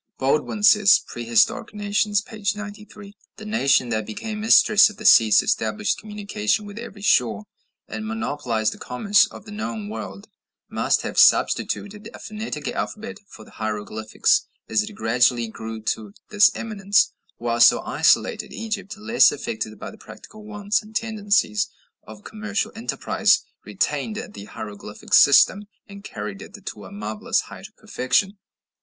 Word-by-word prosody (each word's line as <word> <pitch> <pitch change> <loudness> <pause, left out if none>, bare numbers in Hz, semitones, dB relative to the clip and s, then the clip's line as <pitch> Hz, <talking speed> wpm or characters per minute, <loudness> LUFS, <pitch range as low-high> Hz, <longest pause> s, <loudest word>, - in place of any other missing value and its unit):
Baldwin 150 +10 -1
says 210 0 +6
("Prehistoric 120 - 0
Nations," 205 0 0
p. 215 0 -12
93): 210 0 -10 0.2
"The 215 - -10
nation 140 - +2
that 110 -2 -1
became 215 - -6
mistress 215 -1 +6
of 210 - -13
the 215 - -10
seas, 110 - +6
established 110 -1 -1
communication 210 0 -2
with 205 +2 -9
every 205 -4 -10
shore, 110 - +2 0.4
and 220 - -6
monopolized 145 - -2
the - - -15
commerce 200 +11 +2
of - - -13
the 210 - -11
known 210 0 -5
world, 210 -1 -8 0.4
must - - 0
have - - -2
substituted 210 +2 +2
a - - -11
phonetic 210 -9 -6
alphabet 220 +1 -5
for 110 - -14
the - - -18
hieroglyphics 110 0 -1 0.2
as 110 -1 +1
it 105 - -6
gradually 120 +1 +1
grew 110 0 -7
to 110 -2 -4 0.2
this 210 -1 +6
eminence; 205 -2 +1 0.2
while 120 0 -2 0.2
isolated - - +1
Egypt, 215 -2 -5
less 220 +2 +4
affected - - -5
by - - -8
the - - -16
practical 215 0 -13
wants 205 -1 -2
and 215 0 -16
tendencies 205 - 0 0.3
of 105 -1 -14
commercial 215 0 -4
enterprise, 225 +2 +1 0.2
retained 220 - -2 0.2
the 100 - -9
hieroglyphic 105 0 -9
system, 190 +8 +6 0.2
and 200 0 -12
carried 105 - -7
it 210 - -11
to - - -7
a - - -12
marvellous 215 +2 -2
height 195 - -11
of 215 - -29
perfection." 195 - -1
205 Hz, 145 wpm, -22 LUFS, -, 0.4 s, says